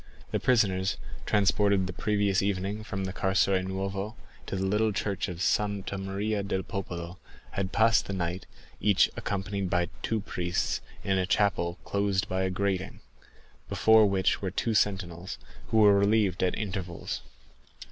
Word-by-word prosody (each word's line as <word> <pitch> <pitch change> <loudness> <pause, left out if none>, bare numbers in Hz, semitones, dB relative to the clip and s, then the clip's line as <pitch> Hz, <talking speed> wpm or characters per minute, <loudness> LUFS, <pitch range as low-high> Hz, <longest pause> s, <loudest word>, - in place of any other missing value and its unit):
The - - 0
prisoners, 95 -6 +2 0.3
transported 100 -1 +3
the 90 - -4
previous 100 0 +1
evening 100 +2 -1
from 100 -3 -4
the 95 0 -3
Carceri 95 -1 +2
Nuove 95 +3 -3 0.3
to - - -3
the 95 0 -1
little 105 +3 +2
church 100 -1 -2
of 90 -1 -4
Santa 100 -1 0
Maria 100 +2 -2
del 95 -1 -2
Popolo, 90 -1 -5 0.3
had 95 -1 -2
passed 110 +1 +3
the 100 - -3
night, 90 0 -3 0.3
each 100 -3 +4
accompanied 100 -1 -2
by 90 -1 +1
two 110 - 0
priests, 90 -3 -1 0.2
in 95 -1 +1
a 90 - 0
chapel 90 -3 +1
closed 100 0 0
by 95 -1 -1
a 95 - +1
grating, 95 0 -2 0.7
before 110 -1 +5
which 95 -1 +1
were 95 - -1
two 110 +5 -1
sentinels, 95 -4 -1 0.3
who 110 - +1
were 105 -2 +7
relieved 100 -2 +2
at 90 - +1
intervals. 95 -4 -4
95 Hz, 150 wpm, -28 LUFS, 95-105 Hz, 0.7 s, were